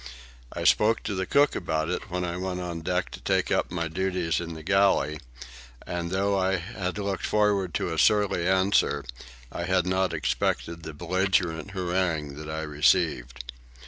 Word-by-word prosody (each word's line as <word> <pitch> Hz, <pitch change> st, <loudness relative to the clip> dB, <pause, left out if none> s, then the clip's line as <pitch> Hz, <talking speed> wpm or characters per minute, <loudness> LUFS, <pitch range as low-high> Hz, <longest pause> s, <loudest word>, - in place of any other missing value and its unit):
I -, -, -5 dB
spoke 110 Hz, +1 st, +4 dB
to 105 Hz, -, -3 dB
the 95 Hz, -1 st, -2 dB
cook 145 Hz, 0 st, +3 dB
about 80 Hz, -3 st, -1 dB
it, 90 Hz, -, -4 dB
when 90 Hz, 0 st, -2 dB
I 85 Hz, 0 st, -3 dB
went 90 Hz, 0 st, -3 dB
on 85 Hz, -2 st, -4 dB
deck 90 Hz, +2 st, -1 dB
to -, -, -9 dB
take -, -, 0 dB
up -, -, +1 dB
my 85 Hz, -2 st, -2 dB
duties 90 Hz, -1 st, -1 dB
in 85 Hz, -1 st, -6 dB
the 80 Hz, -, -9 dB
galley, 95 Hz, -5 st, +2 dB, 0.7 s
and 85 Hz, -1 st, -3 dB
though 100 Hz, +2 st, +1 dB
I 95 Hz, 0 st, +2 dB
had 90 Hz, +2 st, -4 dB
looked 100 Hz, -2 st, -3 dB
forward 105 Hz, -4 st, +1 dB
to 85 Hz, -, -1 dB
a 80 Hz, -, -2 dB
surly 100 Hz, -4 st, +3 dB
answer, 95 Hz, -6 st, +2 dB, 0.5 s
I 85 Hz, -, -4 dB
had 90 Hz, -1 st, +2 dB
not 95 Hz, 0 st, +1 dB
expected 80 Hz, +7 st, -1 dB
the 80 Hz, -2 st, -8 dB
belligerent 90 Hz, +1 st, 0 dB
harangue 85 Hz, -5 st, -1 dB
that 75 Hz, 0 st, -7 dB
I 80 Hz, 0 st, -3 dB
received. 75 Hz, -5 st, +1 dB
90 Hz, 175 wpm, -26 LUFS, 80-95 Hz, 0.7 s, spoke